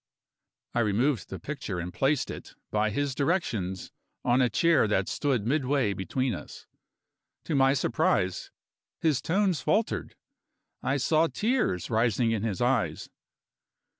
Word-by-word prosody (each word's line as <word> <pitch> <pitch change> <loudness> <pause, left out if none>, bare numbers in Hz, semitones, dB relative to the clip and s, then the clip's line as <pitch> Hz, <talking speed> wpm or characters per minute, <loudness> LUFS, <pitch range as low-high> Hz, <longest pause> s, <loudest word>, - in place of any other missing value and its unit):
I - - +1
removed 115 - +1
the 95 - -5
picture 130 -10 -5
and 90 +1 -5
placed 135 +3 +1
it, - - -10 0.2
by 105 0 +1
his 140 +5 -1
directions, 115 - -1 0.3
on 120 +2 +4
a 125 - +3
chair 160 +1 +3
that 95 -2 +1
stood 130 -8 0
midway 135 -4 +1
between 120 +7 -1
us. - - -9 0.8
To 165 - -3
my 135 -1 +4
surprise 95 -7 0 0.5
his 150 -5 +1
tones 185 -3 +1
faltered; 215 - 0 0.7
I 135 +2 0
saw 155 +4 +3
tears 210 - 0
rising 115 0 +2
in 110 -3 0
his 110 -2 -2
eyes. 125 -2 0
125 Hz, 135 wpm, -28 LUFS, 105-145 Hz, 0.8 s, on